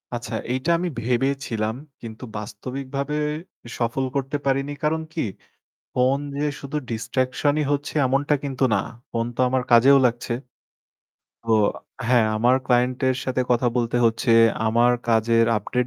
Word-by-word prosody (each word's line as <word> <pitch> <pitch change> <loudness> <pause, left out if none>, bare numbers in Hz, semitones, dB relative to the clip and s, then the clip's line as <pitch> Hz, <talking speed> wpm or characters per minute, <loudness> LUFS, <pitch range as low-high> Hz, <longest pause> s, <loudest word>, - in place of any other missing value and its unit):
আচ্ছা 115 -1 -5 0.2
এইটা 130 +6 -2
আমি 180 0 -2
ভেবে 125 +3 +1 0.2
ছিলাম 110 -1 -2 0.3
কিন্তু 115 +1 -9
বাস্তবিকভাবে 135 +7 -5 0.6
সফল 120 +3 -1
করতে 140 +1 -1
পারিনি। 135 +1 0
কারণ 160 +1 +1
কি 160 - -1 0.7
ফোন 130 +2 +2 0.2
যে 150 - 0
শুধু 140 +2 -4
ডিসট্রাকশনই 130 +6 0
হচ্ছে 145 0 -2
এমনটা 140 +3 +2
কিন্তু 135 -1 -2
না। 100 - +1 0.3
ফোন 115 0 -1
তো - - -18
আমার 130 -1 0
কাজেও 130 +4 +7
লাগছে। 120 0 0 1.1
তো 115 -1 0 0.5
হ্যাঁ 120 -3 +4
আমার 120 +4 +4
ক্লায়েন্টের 125 +1 +2
সাথে 130 0 0
কথা 120 0 +3
বলতে 120 0 0
হচ্ছে। 115 +1 +1 0.4
আমার 120 +2 +4 0.2
কাজের 115 0 +3
আপডেট 125 +4 -1
125 Hz, 135 wpm, -23 LUFS, 115-135 Hz, 1.1 s, কাজেও